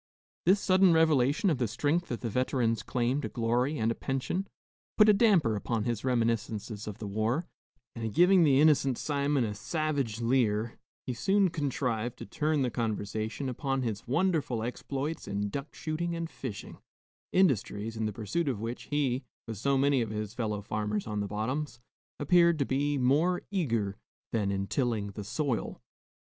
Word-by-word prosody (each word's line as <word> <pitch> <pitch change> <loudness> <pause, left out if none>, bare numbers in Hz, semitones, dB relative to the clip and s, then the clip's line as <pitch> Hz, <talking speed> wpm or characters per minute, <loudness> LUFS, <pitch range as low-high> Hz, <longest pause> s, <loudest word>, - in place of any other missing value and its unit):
This 195 +3 +6
sudden 185 -2 +4
revelation 160 - +3
of 140 - -1
the 120 - +1
strength 145 +10 0
of 120 - -4
the 115 - -2
veteran's 120 -2 +1
claim 125 +3 0
to - - -4
glory 125 +5 0
and 110 -2 +1
a - - +1
pension, 135 +11 -2 0.5
put 215 - +7
a 210 - +7
damper 195 - +4
upon 110 +1 -2
his 115 -2 -2
reminiscences 115 -3 -1
of 105 - -5
the 110 - -6
war; 110 - -1 0.5
and 115 -2 -3
giving 180 - +5
the 140 -3 +5
innocent 140 -4 +4
Simon 140 -2 0
a 105 -2 -2
savage 140 -1 -2
leer, 115 -2 +1 0.3
he 125 - -2
soon 190 - +2
contrived 125 -5 -2
to - - -8
turn 150 -2 0
the 125 - 0
conversation 110 +2 -3
upon 135 +1 -2
his 110 -3 -4
wonderful 145 -5 +1
exploits 140 +5 -4
in 100 0 -2
duck 140 +7 -6
shooting 170 +2 -3
and 165 0 -4
fishing 120 -7 -7 0.5
industries 115 - +1
in 110 -1 -1
the - - -2
pursuit 115 - -2
of 120 -6 -2
which 115 +3 -5
he, 135 -3 0 0.2
with 115 -2 -5
so 135 +6 +1
many 140 -1 +3
of 115 - -2
his 105 0 -4
fellow 105 -4 -3
farmers 105 0 -2
on 105 -1 -3
the 100 - -2
bottoms, 120 +6 -3 0.4
appeared 170 +2 +4
to 140 - +1
be 145 +2 0
more 150 +8 +2
eager 115 - -1 0.3
than 105 -3 0
in 100 0 -1
tilling 110 -3 -1
the 105 +1 -7
soil. 130 +3 -2
125 Hz, 170 wpm, -29 LUFS, 110-150 Hz, 0.5 s, put